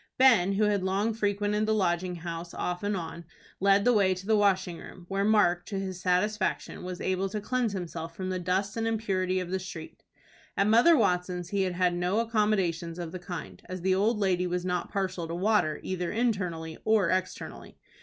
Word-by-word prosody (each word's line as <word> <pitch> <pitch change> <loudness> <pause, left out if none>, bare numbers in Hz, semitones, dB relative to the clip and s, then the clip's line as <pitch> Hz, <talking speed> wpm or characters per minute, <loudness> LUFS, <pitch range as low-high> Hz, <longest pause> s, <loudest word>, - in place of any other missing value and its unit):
Ben, 230 -8 +5
who 205 +2 +1
had 205 -2 +2
long 195 +4 0
frequented 210 0 0
the 220 - +2
Lodging 180 -2 0
House 170 0 -6
off 180 0 -2
and 205 -1 -1
on, 170 0 -6 0.4
led 200 +1 +4
the 245 - +5
way 190 -4 +3
to 185 +1 -9
the 220 +1 +3
washing 190 -4 +2
room, 180 - -12
where 195 0 0
Mark, 205 -5 +3
to 200 - -3
his 190 -2 -5
satisfaction, 190 +3 0
was 180 0 -5
able 190 +1 -1
to 210 +2 -3
cleanse 235 0 -1
himself 165 -3 -5
from 185 +1 -4
the 185 - -2
dust 190 +4 -1
and 225 0 -1
impurity 190 -5 0
of 180 -1 -5
the 190 - 0
street. 175 -4 -9 0.6
At 200 - +3
Mother 235 +10 +6
Watson's 180 -4 0
he 200 0 0
had 185 -1 0
had 180 0 +2
no 180 +3 0
accommodations 195 -7 0
of 170 -2 -5
the 185 - -6
kind, 175 - -7
as 185 -1 -5
the 190 +1 +2
old 210 +4 +2
lady 185 -3 +1
was 180 0 -2
not 180 -1 -2
partial 190 -4 -2
to 165 - -4
water 185 -5 +1
either 180 -2 -2
internally 180 -9 -1
or 215 -6 +3
externally. 185 0 -4
185 Hz, 200 wpm, -28 LUFS, 180-210 Hz, 0.6 s, Mother